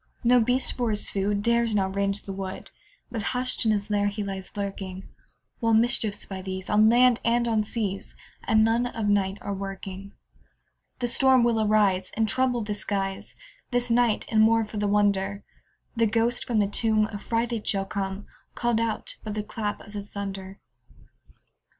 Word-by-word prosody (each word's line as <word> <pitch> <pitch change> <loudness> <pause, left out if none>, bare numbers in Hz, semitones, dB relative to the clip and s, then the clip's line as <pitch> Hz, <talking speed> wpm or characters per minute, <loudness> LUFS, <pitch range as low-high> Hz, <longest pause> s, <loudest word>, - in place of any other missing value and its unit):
No 245 +1 +5
beast, 250 +3 +1
for 245 -2 -1
his 210 -1 -1
food, 200 +1 0
Dares 235 -1 +2
now 195 -2 +2
range 200 +1 -1
the 195 - -6
wood, 190 -1 -6 0.4
But 225 - -3 0.2
hush'd 250 -2 +1
in - - +4
his 205 0 -1
lair 205 0 +2
he 205 +1 -3
lies 195 -2 -5
lurking; 195 -1 -5 0.5
While 230 -2 +3
mischiefs, 225 -2 +1
by 190 -1 -6
these, 190 0 -5
On 215 +1 +6
land 245 0 +5
and 235 +1 +2
on 220 -2 +2
seas, 205 -3 -4 0.3
At 220 - +2
noon 225 +3 +3
of 225 -3 -3
night 200 -1 +1
are - - -4
a - - -1
working. 195 0 -7 0.8
The 245 - -1
storm 260 0 +4
will 230 -2 +2
arise, 205 -3 +2
And 225 -1 +2
trouble 250 -1 +1
the 210 0 -3
skies 195 -2 -3 0.3
This 245 -1 0
night; 235 -2 +2
and, 215 -1 +4
more 225 0 +4
for 215 0 -8
the 205 0 0
wonder, 200 -1 +1 0.5
The 230 -1 +3
ghost 230 +2 +1
from 235 - 0
the 210 - +4
tomb 215 +1 +2
Affrighted 230 +2 -2
shall 195 -1 +1
come, 195 0 -4 0.3
Call'd 240 -2 +1
out 230 -1 -2
by 215 - -4
the 210 0 -3
clap 210 -1 -4
of 205 - -13
the 205 - -4
thunder. 195 -1 -7
210 Hz, 180 wpm, -26 LUFS, 200-230 Hz, 0.8 s, On